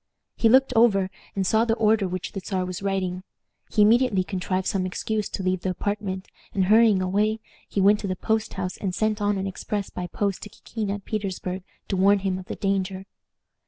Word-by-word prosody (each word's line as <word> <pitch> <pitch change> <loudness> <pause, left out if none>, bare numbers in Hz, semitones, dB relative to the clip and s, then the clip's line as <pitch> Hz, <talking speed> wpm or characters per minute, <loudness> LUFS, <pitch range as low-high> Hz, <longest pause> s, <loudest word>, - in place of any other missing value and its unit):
He 225 - +3
looked 260 +2 +5
over, 195 -5 +4 0.2
and 195 -1 0
saw 220 +4 +3
the 225 -1 +1
order 220 -3 +3
which 185 0 -4
the 195 - -5
Czar 185 -1 -1
was 180 0 -5
writing. 190 -2 -1 0.5
He 210 - +4
immediately 225 -3 +4
contrived 185 0 -2
some 190 -2 0
excuse 210 +3 -2
to 195 - -4
leave 185 -1 0
the 185 - -1
apartment, 190 0 -3 0.3
and 190 -2 +2
hurrying 215 -1 +5
away, 210 +4 +1 0.3
he 200 - 0
went 205 +2 +5
to 200 - -4
the 185 - -1
post 220 +3 -1
house 185 -1 -3
and 185 -3 -3
sent 215 0 0
on 205 0 +1
an 190 - -2
express 195 +1 -4
by 180 - -4
post 200 +1 -2
to 210 - -8
Kikin 215 0 -5
at 200 0 -4
Petersburg 190 -3 -3 0.3
to 195 - -1
warn 200 +2 +5
him 190 -1 -2
of 185 - -9
the - - -4
danger. 195 -1 -1
195 Hz, 205 wpm, -25 LUFS, 185-215 Hz, 0.5 s, looked